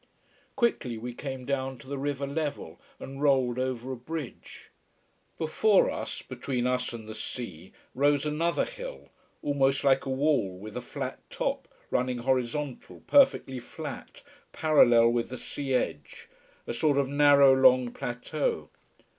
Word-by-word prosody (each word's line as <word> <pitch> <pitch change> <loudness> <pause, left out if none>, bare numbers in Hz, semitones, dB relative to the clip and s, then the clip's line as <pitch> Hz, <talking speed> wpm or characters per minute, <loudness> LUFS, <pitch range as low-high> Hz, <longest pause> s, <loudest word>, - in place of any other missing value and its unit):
Quickly 230 - 0
we 120 +2 -6
came 130 0 -6
down 135 -1 -2
to 130 - -15
the 140 0 -4
river 140 0 -2
level, 145 +1 -4 0.2
and 135 +1 -8
rolled 130 -4 +2
over 130 0 -2
a - - -3
bridge. 140 +2 -8 0.7
Before 190 +6 +3
us, - - -5
between 125 -1 -3
us 125 0 0
and 115 -2 -8
the 110 - -6
sea 95 -6 -7 0.2
rose 145 +2 +2
another 160 +3 0
hill, - - -9 0.3
almost 140 -1 +1
like 135 -1 +4
a - - -2
wall 130 -9 +1
with 105 +3 -9
a - - -3
flat - - -5
top, - - -2 0.2
running 125 0 0
horizontal, 130 +2 -2
perfectly 265 - +4
flat, 120 - -8 0.3
parallel 120 -7 +5
with 120 -1 0
the 130 - -6
sea 135 +1 -3
edge, 75 - -3 0.4
a - - -4
sort 140 +4 +2
of 140 -1 +2
narrow 140 -1 +6
long 130 -2 +5
plateau. 125 - -3
135 Hz, 145 wpm, -28 LUFS, 125-145 Hz, 0.7 s, narrow